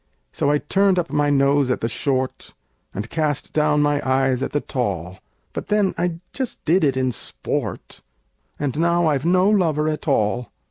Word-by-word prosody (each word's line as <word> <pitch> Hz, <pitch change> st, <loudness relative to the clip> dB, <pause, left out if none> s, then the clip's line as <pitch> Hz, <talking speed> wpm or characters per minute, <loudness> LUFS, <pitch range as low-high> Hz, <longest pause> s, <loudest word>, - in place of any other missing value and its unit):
So 140 Hz, -, 0 dB
I 150 Hz, -, +3 dB
turned 195 Hz, +5 st, +2 dB
up 170 Hz, -1 st, -1 dB
my 145 Hz, 0 st, +2 dB
nose 140 Hz, -1 st, +3 dB
at 125 Hz, -, 0 dB
the 115 Hz, -, 0 dB
short, 130 Hz, +2 st, -2 dB, 0.4 s
And 105 Hz, +3 st, -5 dB
cast 150 Hz, +1 st, -2 dB
down 150 Hz, -1 st, +3 dB
my 145 Hz, 0 st, +1 dB
eyes 130 Hz, -1 st, +1 dB
at -, -, -2 dB
the 145 Hz, -, +1 dB
tall; 95 Hz, -, -3 dB, 0.3 s
But -, -, -5 dB
then 210 Hz, -2 st, +2 dB
I 175 Hz, -2 st, -2 dB
just 260 Hz, -3 st, -4 dB
did 170 Hz, +4 st, +3 dB
it 135 Hz, -3 st, +2 dB
in 130 Hz, -1 st, +1 dB
sport 115 Hz, -, -4 dB, 0.6 s
And 145 Hz, 0 st, -2 dB
now 170 Hz, +1 st, +2 dB
I've 145 Hz, -2 st, +1 dB
no 180 Hz, +2 st, +4 dB
lover 165 Hz, -7 st, +2 dB
at 155 Hz, 0 st, -3 dB
all! 120 Hz, -2 st, +1 dB
145 Hz, 180 wpm, -22 LUFS, 130-170 Hz, 0.6 s, no